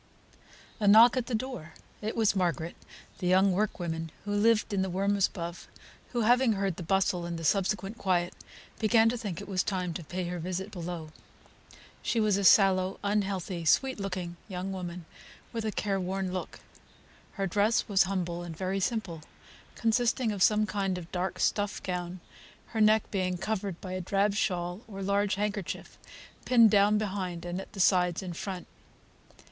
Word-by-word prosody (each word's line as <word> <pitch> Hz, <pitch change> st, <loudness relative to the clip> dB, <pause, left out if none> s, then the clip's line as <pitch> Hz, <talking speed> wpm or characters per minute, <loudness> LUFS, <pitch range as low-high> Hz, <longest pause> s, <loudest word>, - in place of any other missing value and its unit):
A 210 Hz, -, +1 dB
knock 225 Hz, +5 st, +8 dB
at 255 Hz, -2 st, -1 dB
the 245 Hz, -, -1 dB
door! 220 Hz, -10 st, -5 dB, 0.3 s
It 215 Hz, +1 st, -3 dB
was 220 Hz, -3 st, +2 dB
Margaret, 170 Hz, -3 st, -1 dB, 0.4 s
the 180 Hz, -, -2 dB
young 190 Hz, +2 st, +5 dB
workwoman 175 Hz, -4 st, -2 dB, 0.2 s
who 205 Hz, -, -2 dB
lived 215 Hz, +1 st, +3 dB
in 195 Hz, -, +1 dB
the 190 Hz, -, -1 dB
rooms 195 Hz, +2 st, +2 dB
above, 170 Hz, -1 st, -7 dB, 0.4 s
who 240 Hz, -, 0 dB
having 245 Hz, +1 st, +4 dB
heard 195 Hz, -3 st, -1 dB
the -, -, -6 dB
bustle, 185 Hz, 0 st, +1 dB
and 170 Hz, -1 st, -4 dB
the 165 Hz, -, -6 dB
subsequent 195 Hz, +4 st, 0 dB
quiet, 175 Hz, -2 st, +1 dB, 0.5 s
began 225 Hz, +1 st, +4 dB
to 240 Hz, -, -1 dB
think 205 Hz, -8 st, -5 dB
it -, -, -8 dB
was 190 Hz, -2 st, +1 dB
time 180 Hz, -4 st, -2 dB
to 170 Hz, -, -6 dB
pay 180 Hz, +4 st, -4 dB
her 180 Hz, 0 st, -4 dB
visit 185 Hz, +4 st, -4 dB
below. 170 Hz, -4 st, -6 dB, 0.9 s
She 230 Hz, -, 0 dB
was 215 Hz, -2 st, +3 dB
a 200 Hz, -, 0 dB
sallow, 190 Hz, -1 st, +5 dB
unhealthy, 195 Hz, -4 st, -1 dB
sweet 260 Hz, +10 st, +2 dB
looking 185 Hz, -3 st, -4 dB
young 190 Hz, -1 st, -4 dB
woman, 180 Hz, -2 st, -6 dB, 0.5 s
with 225 Hz, -1 st, -3 dB
a 215 Hz, -, 0 dB
careworn 195 Hz, -2 st, -2 dB
look; 185 Hz, -, -5 dB, 0.7 s
her 195 Hz, -, -2 dB
dress 205 Hz, +4 st, +2 dB
was 195 Hz, -2 st, +3 dB
humble 175 Hz, -3 st, -2 dB
and 170 Hz, -2 st, -7 dB
very 190 Hz, +2 st, -1 dB
simple, 190 Hz, -6 st, -2 dB, 0.5 s
consisting 235 Hz, +1 st, +1 dB
of 200 Hz, -2 st, -4 dB
some 215 Hz, +2 st, +4 dB
kind 195 Hz, -3 st, -1 dB
of 170 Hz, -2 st, -9 dB
dark 180 Hz, 0 st, -2 dB
stuff 205 Hz, -1 st, 0 dB
gown, 180 Hz, -1 st, -4 dB, 0.5 s
her 220 Hz, -, -1 dB
neck 215 Hz, 0 st, +4 dB
being 185 Hz, -2 st, -1 dB
covered 195 Hz, -2 st, -3 dB
by 185 Hz, -, -6 dB
a 185 Hz, 0 st, -3 dB
drab 200 Hz, +3 st, +1 dB
shawl 180 Hz, -1 st, -1 dB
or 195 Hz, -3 st, -7 dB
large 200 Hz, 0 st, +1 dB
handkerchief, 205 Hz, -2 st, -4 dB, 0.4 s
pinned 230 Hz, -4 st, +6 dB
down 205 Hz, +1 st, +5 dB
behind 190 Hz, -5 st, -3 dB
and 175 Hz, +2 st, -3 dB
at -, -, -12 dB
the 200 Hz, -, -8 dB
sides 180 Hz, -1 st, +3 dB
in 180 Hz, -2 st, -5 dB
front. 185 Hz, +1 st, -5 dB
195 Hz, 175 wpm, -29 LUFS, 180-210 Hz, 0.9 s, knock